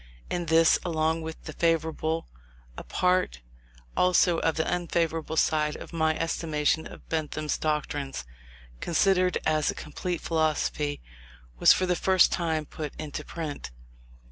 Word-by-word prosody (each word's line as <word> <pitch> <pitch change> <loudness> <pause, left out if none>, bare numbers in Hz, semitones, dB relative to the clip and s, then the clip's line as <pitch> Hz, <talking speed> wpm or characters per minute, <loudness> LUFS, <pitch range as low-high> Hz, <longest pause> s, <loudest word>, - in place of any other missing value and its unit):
In 175 -1 -2
this, 160 0 +5
along 160 -1 0
with 160 0 -7
the - - -7
favourable, 160 -1 0 0.5
a - - -7
part 180 - +1 0.5
also 180 -1 +4
of 160 - +1
the 160 - 0
unfavourable 165 -2 -1
side 150 -1 +2
of - - -10
my 160 -1 +1
estimation 160 -1 0
of - - -13
Bentham's 155 -1 -2
doctrines, 145 - -2 0.5
considered 185 +1 +2
as 155 -1 +2
a - - -2
complete 175 +3 -4
philosophy, 155 - 0 0.6
was - - +8
for 185 - +3
the 180 -1 +1
first 185 +1 +4
time 160 -3 0
put 150 -1 -6
into 150 -2 -6
print. 155 - -6
160 Hz, 135 wpm, -27 LUFS, 155-170 Hz, 0.6 s, was